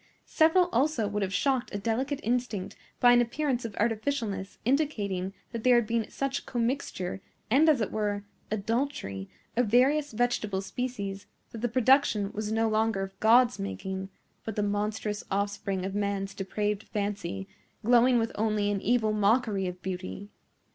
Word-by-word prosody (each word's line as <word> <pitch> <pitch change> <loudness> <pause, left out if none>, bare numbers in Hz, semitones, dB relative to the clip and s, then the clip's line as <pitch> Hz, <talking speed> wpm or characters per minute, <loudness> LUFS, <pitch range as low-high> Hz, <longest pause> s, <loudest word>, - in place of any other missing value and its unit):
Several 325 +3 +4
also 255 -4 +1
would 205 0 -2
have 190 -1 -1
shocked 255 +6 0
a - - -3
delicate 245 +7 -1
instinct 235 -5 -1 0.2
by 245 - +7
an 245 0 +6
appearance 250 0 -1
of 225 - -5
artificialness 220 -3 -1
indicating 210 -9 0 0.2
that 230 -3 -5
there 250 -1 +6
had 240 -2 +4
been 230 0 -1
such 275 0 -3
commixture, 230 -7 -2 0.3
and, 300 +6 +6
as 280 -6 +4
it 215 - -1
were, 205 -1 -1 0.3
adultery, 215 - -2 0.3
of 245 0 +2
various 275 +6 +3
vegetable 215 -4 0
species, 200 -3 -4 0.2
that 230 - -7
the 240 - 0
production 240 -4 +3
was 215 0 -4
no 225 +1 +2
longer 220 -2 +1
of 195 0 -8
God's 240 +3 +5
making, 190 - -4 0.3
but 220 - -5
the 210 - 0
monstrous 205 +1 -2
offspring 195 -1 -1
of 195 - -3
man's 200 -1 -1
depraved 205 +1 -2
fancy, 200 - -4 0.4
glowing 245 +1 +5
with 230 0 0
only 210 -1 0
an 200 -1 -1
evil 225 -2 +2
mockery 210 -2 +2
of 180 0 -7
beauty. 190 +2 -5
215 Hz, 155 wpm, -28 LUFS, 200-245 Hz, 0.4 s, by